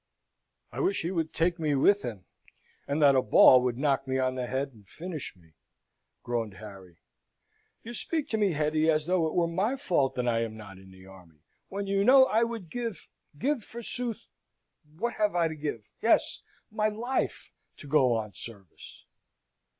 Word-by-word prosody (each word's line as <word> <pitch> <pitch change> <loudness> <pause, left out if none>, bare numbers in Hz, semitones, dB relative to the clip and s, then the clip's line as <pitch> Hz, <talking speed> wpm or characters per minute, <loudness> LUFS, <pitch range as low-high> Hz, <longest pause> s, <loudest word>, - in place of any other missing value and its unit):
"I - - -7
wish 375 +2 0
he 170 - -2
would 165 -4 -2
take 170 +1 0
me 150 -3 +1
with 200 +9 +4
him, 105 -7 -7 0.6
and 140 +2 -1
that 140 -1 +7
a 130 - +4
ball 130 0 +7
would 125 -1 -1
knock 135 -1 0
me 130 0 0
on 130 -1 +1
the 125 -1 -4
head 135 +2 -2
and 105 -4 -20
finish 165 - -7
me," 80 -3 -24 0.7
groaned 115 -4 -3
Harry. 95 -4 -12 0.9
"You 235 - -8
speak 310 +5 -2
to 220 - 0
me, 200 -4 +2
Hetty, 155 +1 +1
as 155 -1 +2
though 175 -2 +1
it 155 - -5
were 175 - +3
my 190 +9 0
fault 145 - 0
that 125 -1 -1
I 115 -1 +1
am 110 -1 -4
not 100 -3 -11
in 95 0 -16
the 95 0 -15
army, 90 -5 -17 0.3
when 200 +1 -4
you 195 0 +1
know 260 +4 +7
I 225 -3 +1
would 230 -8 -5
give 235 -5 -5 0.3
give, 270 - -1
forsooth, 235 0 -6 0.7
what 235 +5 -2
have 210 -3 +1
I 170 -1 +3
to 160 - -5
give? 145 -8 -5
yes! - - +2 0.3
my 215 0 +1
life 240 +5 -3 0.3
to - - -12
go 135 -4 +3
on 105 -2 -4
service!" 100 -3 -12
155 Hz, 185 wpm, -28 LUFS, -, 0.9 s, that